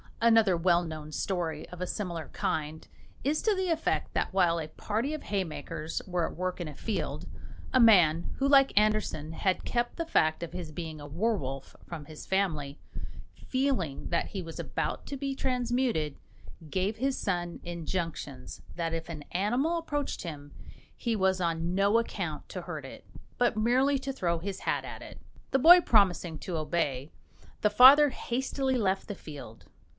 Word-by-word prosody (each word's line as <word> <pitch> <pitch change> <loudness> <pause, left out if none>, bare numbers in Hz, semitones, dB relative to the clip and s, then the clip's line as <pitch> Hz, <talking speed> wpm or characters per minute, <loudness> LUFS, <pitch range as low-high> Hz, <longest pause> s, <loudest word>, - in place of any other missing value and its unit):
Another 225 -5 +5
well 175 0 +3
known 155 -2 -7
story, 165 -3 -2
of 180 - -10
a - - 0
similar 175 -6 -4
kind, 155 0 -3 0.4
is 295 +3 +1
to 430 -2 +2
the 375 -1 -1
effect 325 -1 0
that - - -1
while 175 -3 +3
a 155 - -4
party 220 - -2
of 310 - -8
haymakers 165 -4 -3
were 175 -2 0
at - - -8
work 185 +1 -3
in 170 - -3
a 150 - -8
field, 220 +6 -3 0.5
a 260 - +5
man, 175 -8 +6
who, 275 - +1
like 275 -1 +6
Andersen, 210 -7 +1
had 185 +2 0
kept 240 0 -1
the 335 - -2
fact 160 - +2
of 170 - -6
his 170 -4 -6
being 160 -1 -6
a 145 - -8
werwolf 145 - -2
from 160 -4 -7
his 155 +1 -10
family, 155 -8 -1 0.7
feeling 255 - -1
that 170 - 0
he 190 -3 -5
was 165 -1 -8
about - - -3
to 280 - -4
be 275 0 -3
transmuted, 245 - 0 0.5
gave 190 +6 -1
his 265 +3 0
son 175 -3 -2
injunctions 165 -6 -5
that 165 -1 -2
if 165 +1 -4
an 155 -3 -6
animal 245 - +1
approached 290 -4 -3
him 145 -4 -7 0.4
he 235 -2 -1
was 190 -2 +2
on 170 +1 -1
no 200 +3 +4
account 230 - -4
to - - -6
hurt - - -6
it, - - -11 0.3
but 245 -2 +2
merely 260 +5 +3
to 270 0 -4
throw 170 -9 0
his 195 +2 -5
hat - - -1
at - - -8
it. - - -11 0.3
The 270 - +3
boy 350 +6 +9
promising 185 - +3
to 175 -3 -4
obey, 150 -3 -1 0.5
the 210 - +4
father 270 +7 +9
hastily 265 +1 -1
left 195 -4 0
the 205 - -5
field. 145 - -10
185 Hz, 170 wpm, -29 LUFS, 165-245 Hz, 0.7 s, boy